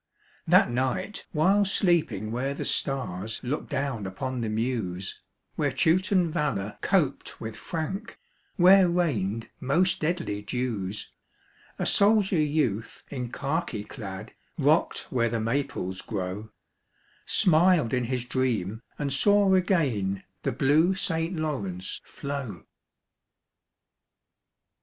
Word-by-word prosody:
That - - +5
night 130 - -2
while 190 +6 +3
sleeping 170 - +1
where 135 +4 -2
the - - -4
stars 110 -7 -1
Look 135 +5 -3
down 135 -7 -2
upon 125 +6 -4
the 110 - -2
Meuse, 110 -5 -2 0.4
Where 145 -2 +1
Teuton 180 +4 +2
valor 110 - -2
coped 170 -9 0
with 110 -1 -6
Frank, 175 - -5 0.4
Where 185 0 +7
rained 115 - 0
most 170 +8 +2
deadly 160 - -1
dews, 105 -3 -3 0.7
A - - -1
soldier 200 -3 +4
youth 145 -8 0
in 125 -3 -4
khaki 140 -7 -2
clad, 105 -3 -8 0.2
Rock'd 155 +2 +2
where 115 -2 +2
the 115 0 -1
Maples 115 -5 -2
grow, 100 +1 -4 0.8
Smiled 175 - +4
in 125 -1 +1
his 125 0 -2
dream 115 -5 -1 0.2
and 140 -2 -1
saw 205 +5 +4
again 135 - +1 0.2
The - - -1
blue 150 +9 +3
St. 165 -1 -1
Lawrence 100 - -3
flow. 140 -9 -6
135 Hz, 110 wpm, -27 LUFS, 110-170 Hz, 0.8 s, Where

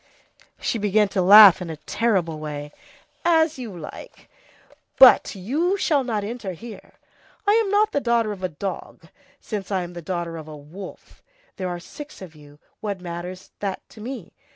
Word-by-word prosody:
She 230 - -1
began 210 0 +2
to 195 - 0
laugh 200 0 +9
in 175 - -5
a 160 - -6
terrible 180 -3 -1
way:— 150 -1 -6 0.5
"As 320 -3 +3
you 220 -8 -7
like, 155 - -11 0.7
but 260 -4 +7
you 300 - 0
shall 295 -7 +2
not 220 -5 -2
enter 210 -3 -5
here. 225 +6 -11 0.5
I'm 420 0 +3
not 420 +2 +3
the - - +1
daughter 235 -3 +1
of 200 -3 -7
a 185 - -1
dog, 190 +5 -7 0.3
since 205 -4 -5
I'm 180 -3 -2
the 175 - -7
daughter 170 -1 -4
of 155 -1 -9
a 155 -1 -9
wolf. 165 +7 -12 0.4
There 185 -1 -3
are 175 0 -4
six 295 - -11
of 185 -4 -10
you, 145 -1 -16 0.2
what 205 -3 -4
matters 180 +1 -7
that 195 -2 -4
to 215 - -14
me? 235 -6 -7
195 Hz, 170 wpm, -23 LUFS, 175-235 Hz, 0.7 s, laugh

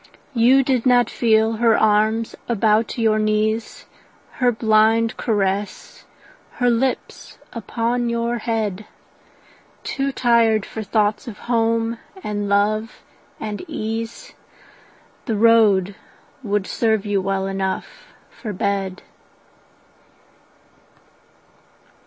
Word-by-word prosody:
You 255 +3 +4
did 255 -2 0
not 245 -1 +4
feel 220 -1 +2
her 230 -1 +3
arms 220 +1 +2
about 220 0 +1
your 220 -2 +2
knees, 215 +1 -1 0.5
Her 250 -2 +3
blind 220 0 +2
caress, 200 -2 -2 0.5
her 245 -1 +1
lips 250 +2 -2 0.2
upon 235 +2 -2
your 235 0 -1
head: 215 -3 -3 1.0
Too 275 0 -2
tired 230 -4 +2
for 220 - -7
thoughts 210 +3 0
of 215 -5 -7
home 230 -1 0 0.2
and 205 -1 -3
love 215 +3 0 0.4
and 210 -1 -5
ease, 230 - -5 0.9
The 225 - 0
road 210 -4 +4 0.5
would 205 -4 -1
serve 220 0 0
you 205 -2 0
well 195 0 -1
enough 195 - -4 0.2
for 215 -4 -7
bed. 195 0 -2
220 Hz, 100 wpm, -21 LUFS, 210-235 Hz, 1.0 s, You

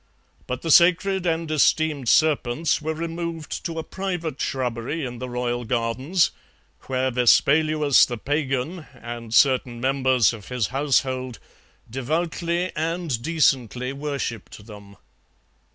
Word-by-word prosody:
But 125 0 -4
the 165 - 0
sacred 180 +3 +4
and 165 -1 -1
esteemed 150 -3 +2
serpents 155 0 +2
were 160 +1 -3
removed 165 -1 -5
to 165 -2 -4
a 160 - -2
private 175 -7 -4
shrubbery 130 +4 -2
in 120 -1 -7
the 125 +1 -5
royal 120 0 -2
gardens, 125 - 0 0.6
where 130 0 0
Vespaluus 150 +4 +4
the 120 - -4
Pagan 145 - -2
and 120 -1 -8
certain 125 -1 +3
members 130 -2 +2
of 110 -3 -10
his 125 -4 -2
household 130 -2 0 0.5
devoutly 170 +7 -2
and 160 -5 -2
decently 130 -4 0
worshipped 140 -8 -5
them. 100 -2 -13
135 Hz, 120 wpm, -23 LUFS, 125-160 Hz, 0.6 s, sacred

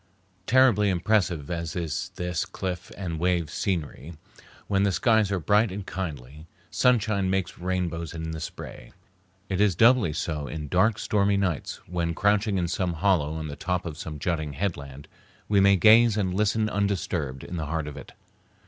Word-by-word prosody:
Terribly 120 -5 +4
impressive 90 -5 0
as 85 -2 -4
is 85 +1 -3
this 90 -2 -2
cliff 90 0 -5
and 85 -4 -4
wave 85 -3 0
scenery 85 -4 -3 0.5
when 100 -1 +1
the 100 0 +2
skies 110 +1 +2
are 95 - 0
bright 105 +4 +2
and 100 +1 -6
kindly 75 -5 -6 0.2
sunshine 110 -6 +2
makes 95 -2 -2
rainbows 85 -3 -2
in 80 0 -4
the 80 - -5
spray, 80 - -8 0.5
it 95 0 -1
is 105 -4 +3
doubly 115 -4 +5
so 75 -1 -3
in 75 +2 -6
dark, 105 +6 +3
stormy 100 -2 +1
nights, 90 -6 -2
when, 85 -1 -2
crouching 105 +1 +2
in 90 -2 0
some 90 +1 -1
hollow 80 -3 +1
on 80 -1 -4
the 70 - -6
top 90 +4 -2
of 80 -3 -5
some 75 -1 -7
jutting 80 -2 -2
headland, 70 -4 -4 0.4
we 105 -1 +3
may 100 0 +6
gaze 110 +3 +6
and 95 -3 0
listen 105 +2 +1
undisturbed 90 -9 -2
in 90 - -6
the 80 -2 -3
heart 80 -1 -2
of 75 - -7
it. 70 - -11
90 Hz, 170 wpm, -26 LUFS, 80-100 Hz, 0.5 s, may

